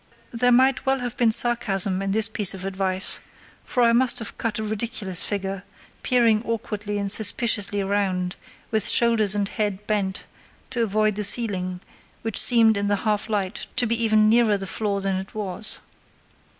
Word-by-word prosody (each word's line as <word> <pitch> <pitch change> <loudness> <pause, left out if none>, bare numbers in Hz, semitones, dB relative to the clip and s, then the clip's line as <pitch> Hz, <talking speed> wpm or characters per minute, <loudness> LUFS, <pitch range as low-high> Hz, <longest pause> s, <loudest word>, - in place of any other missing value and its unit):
There 245 +1 +2
might 260 +2 +3
well 270 -1 0
have 245 -1 -4
been 235 -2 +3
sarcasm 200 -5 +2
in 195 0 -2
this 220 +2 +2
piece 210 -3 0
of 190 0 -8
advice, 190 -1 -1 0.4
for 250 - 0
I 235 0 +4
must 250 +1 +3
have 225 - -7
cut 225 -2 -3
a 220 - -3
ridiculous 215 -3 -3
figure, 195 -2 -3 0.4
peering 230 -4 +3
awkwardly 215 -3 -4
and 200 -1 -2
suspiciously 205 -2 +1
round, 190 -2 -1 0.4
with 220 -3 +2
shoulders 220 -4 +3
and 205 -1 0
head 205 -1 -3
bent 200 -3 -1 0.5
to 245 -2 -1
avoid 215 -1 +1
the 210 - -1
ceiling, 185 -5 -1 0.4
which 225 -2 +2
seemed 225 -3 +4
in 200 0 0
the 205 - +2
half 210 0 0
light 205 -1 -2
to 245 - +3
be 230 0 -1
even 215 -1 +4
nearer 220 -2 +4
the 195 - -6
floor 200 0 -2
than 195 -1 -1
it 190 +2 -8
was. 210 0 -1
210 Hz, 175 wpm, -23 LUFS, 195-230 Hz, 0.5 s, I